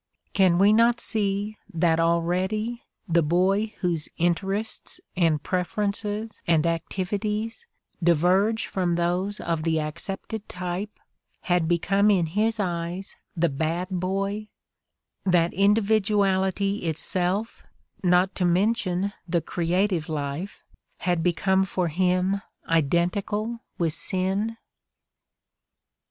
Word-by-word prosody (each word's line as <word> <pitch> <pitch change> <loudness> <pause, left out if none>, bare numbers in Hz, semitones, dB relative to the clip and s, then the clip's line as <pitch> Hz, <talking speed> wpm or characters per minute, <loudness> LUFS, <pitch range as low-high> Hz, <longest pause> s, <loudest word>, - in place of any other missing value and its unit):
Can 185 -3 +4
we 200 +3 +5
not 235 +2 +4
see 210 -1 -1
that 165 -2 +2
already 185 +8 0 0.3
the 170 0 +3
boy 185 +7 +2
whose 170 -5 0
interests 195 +5 -1 0.2
and 165 -4 +2
preferences 205 +3 -2
and 165 -1 +3
activities 205 - -2 0.3
diverge 180 +6 +3
from 180 -3 -1
those 180 +4 0
of 165 -2 -2
the 160 0 +1
accepted 195 +7 -5
type 180 +3 -4 0.5
had 175 -3 +1
become 195 +5 +2
in 185 -5 +3
his 215 +7 0
eyes 175 0 -3 0.2
the 170 +1 +3
"bad" 160 +5 -2
boy, 195 +3 -2 0.8
that 175 -3 +2
individuality 200 -1 +2
itself, 180 +6 -1 0.4
not 180 +1 +3
to 185 - -2
mention 185 +1 +1
the 170 0 +1
creative 175 +1 0
life, 150 +5 -4 0.4
had 175 -2 +1
become 190 +3 +2
for 185 -2 -1
him 185 +3 +1 0.3
identical 180 +8 0 0.2
with 165 -3 0
"sin"? 195 +6 +2
185 Hz, 105 wpm, -25 LUFS, 170-205 Hz, 0.8 s, we